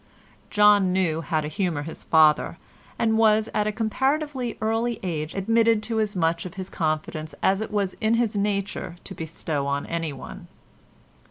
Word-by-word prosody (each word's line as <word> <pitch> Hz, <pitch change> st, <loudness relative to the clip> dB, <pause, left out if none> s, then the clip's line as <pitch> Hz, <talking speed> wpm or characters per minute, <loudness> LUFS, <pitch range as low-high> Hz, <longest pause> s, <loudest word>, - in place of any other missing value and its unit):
John 205 Hz, -2 st, +5 dB
knew 175 Hz, -4 st, +1 dB
how 155 Hz, 0 st, -1 dB
to 150 Hz, -, -4 dB
humour 155 Hz, -2 st, -1 dB
his 160 Hz, -, -7 dB
father, 155 Hz, +1 st, +4 dB, 0.4 s
and 220 Hz, -1 st, +2 dB
was 220 Hz, -1 st, +4 dB
at 210 Hz, 0 st, +1 dB
a -, -, +1 dB
comparatively 265 Hz, +3 st, -1 dB
early 225 Hz, +1 st, 0 dB
age 160 Hz, -4 st, -3 dB
admitted 225 Hz, +2 st, +3 dB
to 225 Hz, -1 st, -1 dB
as 210 Hz, -1 st, -1 dB
much 165 Hz, -1 st, +1 dB
of 180 Hz, 0 st, -8 dB
his 190 Hz, -1 st, -6 dB
confidence 155 Hz, -1 st, -2 dB
as 195 Hz, +2 st, +3 dB
it 220 Hz, -, -3 dB
was 200 Hz, -3 st, -1 dB
in 220 Hz, +1 st, +3 dB
his 230 Hz, -2 st, 0 dB
nature 200 Hz, -3 st, -2 dB
to 195 Hz, -, -8 dB
bestow 160 Hz, -4 st, -3 dB
on 140 Hz, 0 st, -1 dB
anyone. 165 Hz, -5 st, -5 dB
195 Hz, 165 wpm, -25 LUFS, 160-220 Hz, 0.4 s, John